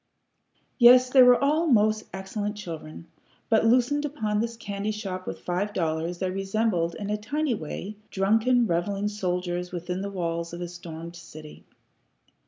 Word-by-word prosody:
Yes, 250 +1 +7
they 265 - +7
were 250 -1 +7
all 305 +4 +2
most 215 -4 +3
excellent 205 +2 -4
children, 165 -4 -8 0.4
but, 225 -1 +4
loosened 255 +5 +3
upon 220 -8 -1
this 230 +1 -2
candy 200 -1 -4
shop 195 -4 -5
with - - -5
five 190 +4 -2
dollars, 165 0 -1
they 185 0 -2
resembled, 195 -3 0
in 205 0 -4
a 210 - 0
tiny 280 +6 -1
way, 200 +3 -6
drunken 225 +5 +2
revelling 200 +3 -1
soldiers 180 -3 -3
within 180 +1 -4
the 200 - -3
walls 170 -3 -3
of 170 - -6
a 175 - -3
stormed 170 -1 -9
city. 155 -2 -12
200 Hz, 155 wpm, -26 LUFS, 175-225 Hz, 0.4 s, Yes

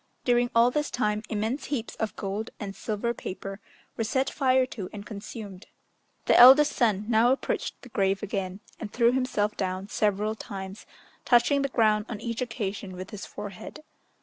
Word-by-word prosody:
During 245 -1 +3
all 235 +2 +5
this 295 +2 -1
time, 210 -3 0
immense 220 +6 -2
heaps 255 -5 -3
of 220 -3 -3
gold 205 +3 -4
and 200 -2 -6
silver 225 +2 -2
paper 195 -2 -7 0.4
were 225 - -1
set 260 +5 0
fire 260 -2 +3
to 210 -7 -7
and 205 -1 -8
consumed. 200 -2 -8 0.6
The - - +4
eldest 270 +4 +9
son 215 -4 +1
now 235 +1 +4
approached 265 - -2
the 250 - -11
grave 195 -2 0
again, 195 -2 -3 0.2
and 210 -3 -6
threw 235 0 +4
himself 250 -5 0
down 190 +1 -3
several 210 +1 +1
times, 195 -2 -8 0.4
touching 260 +4 +4
the 275 - 0
ground 215 -3 +2
on 220 -4 -5
each 235 0 -4
occasion 205 -5 -4
with 185 +3 -8
his 210 -2 -7
forehead. 205 +9 -8
215 Hz, 170 wpm, -27 LUFS, 200-245 Hz, 0.6 s, eldest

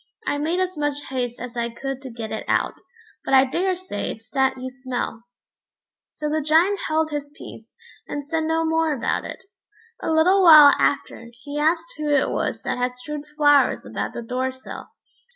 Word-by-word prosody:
I 290 - -1
made 325 +5 0
as 370 -4 -2
much 290 -1 -1
haste 245 -2 -3
as 245 0 -7
I 235 0 -1
could 270 +3 -5
to 265 - -8
get 230 -2 -7
it 220 - -4
out, - - +1 0.5
but 270 - +2
I 265 0 +7
daresay 365 - -2
it's 220 0 -8
that 265 -1 +1
you 260 0 -6
smell." 255 -3 -5 0.8
So 300 - -5
the 310 +1 0
Giant 330 +7 +3
held 315 0 0
his 290 -1 -4
peace, 225 - -11 0.4
and 290 -1 -5
said 320 +1 -1
no 325 +1 +1
more 320 -1 +1
about 235 - -1
it. - - -8 0.6
A - - -3
little 340 +5 +4
while 305 -5 +9
after, 235 -4 -1
he 285 +5 -7
asked 325 +10 0
who 300 -1 -2
it 285 -2 +2
was - - -2
that - - -2
had 250 0 -1
strewed 295 +3 -7
flowers 290 -2 +4
about - - -4
the 235 - -5
door 255 +3 -2
sill. 260 0 -10
290 Hz, 190 wpm, -23 LUFS, 255-320 Hz, 0.8 s, while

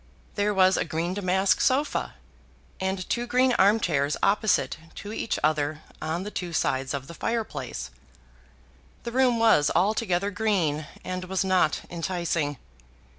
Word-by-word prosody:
There 205 0 +1
was 190 -1 +4
a - - +1
green 165 +2 -2
damask 190 -1 +2
sofa, 275 +3 +1 0.6
and 190 -1 -2
two 240 0 -1
green 250 +1 +3
arm 205 +3 +5
chairs 145 -6 0
opposite 210 -3 +2 0.2
to 205 +1 -7
each 225 - -2
other 155 0 0 0.2
at 160 +3 -2
the 210 - -6
two 175 -4 -4
sides 135 -2 0
of 135 -1 -5
the 170 - -10
fireplace. 140 - -4 1.1
The 235 - -4
room 250 -1 +3
was 220 -10 +4
altogether 200 +1 +1
green, 180 -8 0 0.2
and 185 0 -4
was 190 +1 -1
not 185 -1 +2
enticing. 170 -4 -2
185 Hz, 140 wpm, -26 LUFS, 155-210 Hz, 1.1 s, arm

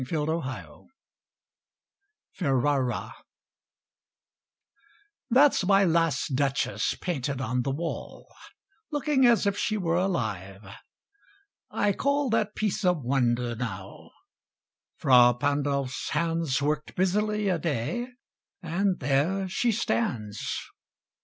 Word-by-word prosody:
MY 165 - -1
LAST 150 - 0
DUCHESS 130 - -6 1.4
Ferrara 135 -4 0 2.2
That's 265 -1 +5
my 195 +1 +4
last 165 -5 +1
Duchess 135 0 0
painted 140 -6 -3
on 125 -1 -1
the 125 - -2
wall, 160 +5 -5 0.6
Looking 290 -4 +2
as 235 -3 +4
if 200 0 +1
she 215 +1 -1
were 170 -3 0
alive. 105 - -2 1.0
I 205 -1 +1
call 280 +2 0
That 215 -2 0
piece 210 -2 -1
a 180 -1 +4
wonder, 125 -4 0
now: 100 -5 -7 0.9
Fra 125 -2 +6
Pandolf's 140 -1 -1
hands 165 -3 0
Worked 150 0 -2
busily 210 +3 +1
a 180 -3 +1
day, 160 - -2 0.6
and 180 +3 0
there 150 +9 0
she 235 +6 +1
stands. 130 - -2
160 Hz, 100 wpm, -27 LUFS, 130-195 Hz, 2.2 s, Fra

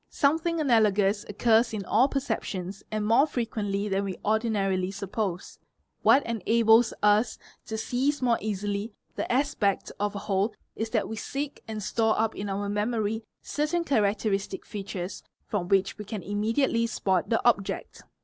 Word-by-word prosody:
Something 325 +3 +1
analogous 210 -7 +3
occurs 225 +2 +3
in 200 -2 -4
all 235 +8 +4
perceptions 200 -9 -3
and 215 -1 -2
more 235 +7 +5
frequently 210 -6 -2
than 195 0 0
we 195 -2 -4
ordinarily 205 -4 +1
suppose: 195 -1 -4 0.4
what 275 - +5
enables 225 +1 +4
us 210 +3 +3 0.3
to 220 - -3
seize 265 +6 0
more 240 -3 +2
easily 205 +1 -3 0.2
the - - -2
'aspect 245 -6 +1
of 205 0 -1
a - - -2
whole 200 +2 0 0.2
is 225 0 -3
that 220 -2 0
we 220 - -5
seek 280 +6 -4
and 215 -2 -5
store 220 +2 +1
up 225 0 +1
in 200 0 -4
our 200 +1 -2
memory 215 +1 -1 0.2
certain 305 +4 -1
characteristic 205 - 0
features 195 -2 -5 0.2
from 190 -5 -2
which 195 +2 +1
we - - -4
can 210 -2 -6
immediately 230 +4 +1
spot 190 -5 0
the 225 - +3
object. 200 -5 0
215 Hz, 150 wpm, -27 LUFS, 200-235 Hz, 0.4 s, more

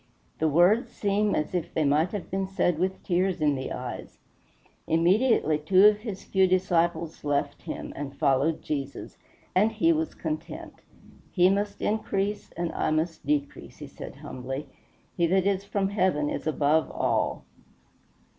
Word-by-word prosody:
The 160 - +2
words 175 - +4
seem 205 0 0
as 150 - -2
if 175 -2 -3
they 160 - +2
might 150 +5 +2
have 205 -3 -6
been 190 0 -1
said 180 -4 0
with 190 +1 -1
tears 185 0 0
in 150 -2 +3
the 130 -1 -4
eyes. - - -6 0.7
Immediately 170 - +3
two 185 +6 +5
of 210 0 +6
his 210 -4 -6
few 190 -1 +3
disciples 170 -3 0
left 145 -1 -1
him - - -6
and 140 -1 -6
followed 140 +4 +1
Jesus; 140 -2 -5 0.3
and 210 +4 +3
he 330 +10 +3
was 320 0 -2
content. 310 0 -6 0.5
"He 180 0 +4
must 200 +1 -2
increase 205 -1 -1
and 170 0 -3
I - - -1
must 155 -1 -2
decrease," 145 -1 -2
he - - -8
said - - -10
humbly. 130 +3 -6 0.5
"He 170 -1 +2
that 190 +2 +2
is 200 0 0
from 200 -1 -1
Heaven 185 -7 +1
is - - -4
above 155 +1 +2
all." - - -1
180 Hz, 155 wpm, -27 LUFS, 155-200 Hz, 0.7 s, of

